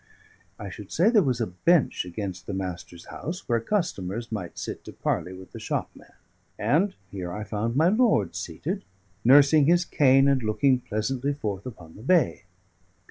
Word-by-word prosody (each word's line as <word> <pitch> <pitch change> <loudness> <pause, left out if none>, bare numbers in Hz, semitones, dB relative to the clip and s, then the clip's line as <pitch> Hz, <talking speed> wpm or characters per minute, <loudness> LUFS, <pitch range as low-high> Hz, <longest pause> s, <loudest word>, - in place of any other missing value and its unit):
I 100 -2 -7
should 100 0 -10
say 190 +8 +3
there 220 -4 +5
was 130 -7 0
a 115 - +1
bench 125 - +1
against 90 0 -6
the 100 - -3
Master's 90 -2 -6
house, 175 +4 -6
where 120 -2 +2
customers 115 - -2
might 95 -6 -5
sit - - -6
to - - -8
parley 90 - -2
with 95 0 -11
the - - -9
shopman; - - -5 0.5
and 190 +6 +1 0.2
here 90 -3 -5
I 105 +4 -5
found 110 +3 -2
my 160 +5 +4
lord 200 - +2
seated, 120 - -4 0.4
nursing 140 +4 +6
his 175 +1 +4
cane 135 -3 +4
and 135 -2 +3
looking 125 +4 +2
pleasantly 125 +5 -2
forth 105 -6 -4
upon 90 -9 -11
the 105 - -12
bay. 145 - +2
115 Hz, 170 wpm, -26 LUFS, 95-150 Hz, 0.5 s, nursing